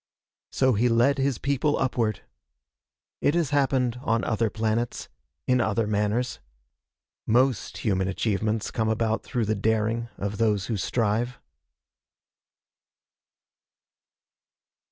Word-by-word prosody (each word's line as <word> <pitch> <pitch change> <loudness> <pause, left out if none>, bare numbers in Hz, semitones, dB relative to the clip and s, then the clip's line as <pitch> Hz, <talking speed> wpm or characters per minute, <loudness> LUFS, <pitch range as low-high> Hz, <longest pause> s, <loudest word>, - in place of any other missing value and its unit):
So 130 -1 +2
he 120 +3 +2
led 120 +5 +3
his 135 -3 +1
people 140 +2 0
upward. 115 -5 0 1.0
It 145 - +2
has 170 -4 +1
happened 130 -4 +1
on 115 -3 0
other 110 -1 0
planets, 110 +2 -2 0.4
in 125 -1 +3
other 110 0 +1
manners. 105 +4 -1 0.9
Most 125 0 +2
human 95 -4 0
achievements 105 +2 -1
come 110 -1 0
about 110 0 0
through 120 -3 -2
the 110 - +1
daring 110 +2 0
of 100 0 -4
those 105 -4 +2
who 115 - -2
strive. 115 +4 -1
115 Hz, 110 wpm, -26 LUFS, 110-125 Hz, 1.0 s, led